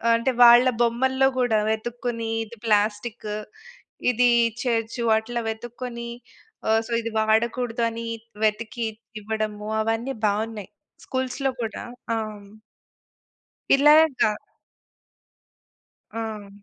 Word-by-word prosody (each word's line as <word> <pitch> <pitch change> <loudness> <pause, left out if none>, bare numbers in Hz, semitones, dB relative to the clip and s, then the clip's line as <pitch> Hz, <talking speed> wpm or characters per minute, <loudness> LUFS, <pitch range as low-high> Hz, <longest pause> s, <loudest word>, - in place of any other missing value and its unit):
అంటే 230 +3 +1
వాళ్ళ 240 +1 +8
బొమ్మల్లో 260 +3 +2
గూడా 225 -4 +2
వెతుక్కొని, 230 +1 -3 0.2
ఇది 230 +2 -13
ప్లాస్టిక్కు, 210 0 0 0.7
ఇది 245 +1 +3 0.2
ఇచ్చేయొచ్చు 230 0 -2
వాటిల్లో 220 +2 0
వెతుక్కొని, 235 +1 -6 0.6
ఆహ్, 220 0 +4
సో, - - -9
ఇది 230 - -3
వాడకూడదు 225 +2 +1
అని 230 0 -6 0.4
వెతికి 225 +2 -1 0.4
ఇవ్వడము, 215 0 -3
అవన్నీ 225 +4 -1
బావున్నాయి 210 0 -3 0.4
స్కూల్స్‌లో 260 +1 -1
కూడా 220 - -5 0.3
ఆ! - - 0
హ్మ్. 205 -2 -10 1.3
ఇలాగా 295 -4 +5 1.8
ఆ! 220 -2 -5
230 Hz, 95 wpm, -24 LUFS, 220-245 Hz, 1.8 s, వాళ్ళ